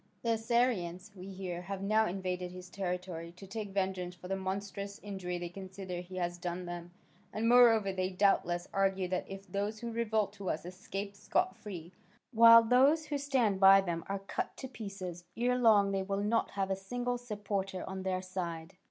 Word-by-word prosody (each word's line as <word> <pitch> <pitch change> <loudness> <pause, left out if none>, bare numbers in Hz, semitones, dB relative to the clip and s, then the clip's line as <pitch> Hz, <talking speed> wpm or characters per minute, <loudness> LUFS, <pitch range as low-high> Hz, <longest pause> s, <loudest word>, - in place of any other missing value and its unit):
The 230 - +1
Assyrians, 225 -5 0
we 185 0 -9
hear, 185 -2 -5
have 195 +1 -5
now 215 +2 +3
invaded 180 -1 -3
his 180 0 -10
territory, 180 -3 -4
to 180 +3 -12
take 205 +1 -5
vengeance 190 -2 -2
for 180 +1 -10
the 195 - -1
monstrous 200 +1 -4
injury 190 -3 -4
they 175 0 -5
consider 190 -1 -7
he 180 +1 -10
has 175 -1 -2
done 180 0 -4
them, 175 0 -6 0.4
and 220 +2 -1
moreover, 230 -5 +6
they 185 0 -1
doubtless 180 -2 +2
argue 195 -1 +1
that 185 0 -2
if 195 0 -8
those 205 +2 -2
who 235 -1 -4
revolt 220 -3 0
to 200 -2 -5
us 155 +1 -2
escape 195 +2 -6
scot 360 - 0
free, 180 -4 -8 0.4
while 230 0 +9
those 270 +7 +4
who 295 -2 -2
stand 255 -8 +1
by 195 0 +9
them 170 -4 -2
are 200 - 0
cut 195 0 -4
to 265 - -6
pieces, 195 -7 -7
ere 245 +2 +2
long 215 -5 +5
they 195 -1 0
will 195 +1 -2
not 225 +2 +1
have 195 -1 -2
a - - +2
single 245 +6 -3
supporter 200 -5 -3
on 190 0 -4
their 185 -1 -1
side. 175 -2 -5
195 Hz, 185 wpm, -32 LUFS, 180-215 Hz, 0.4 s, while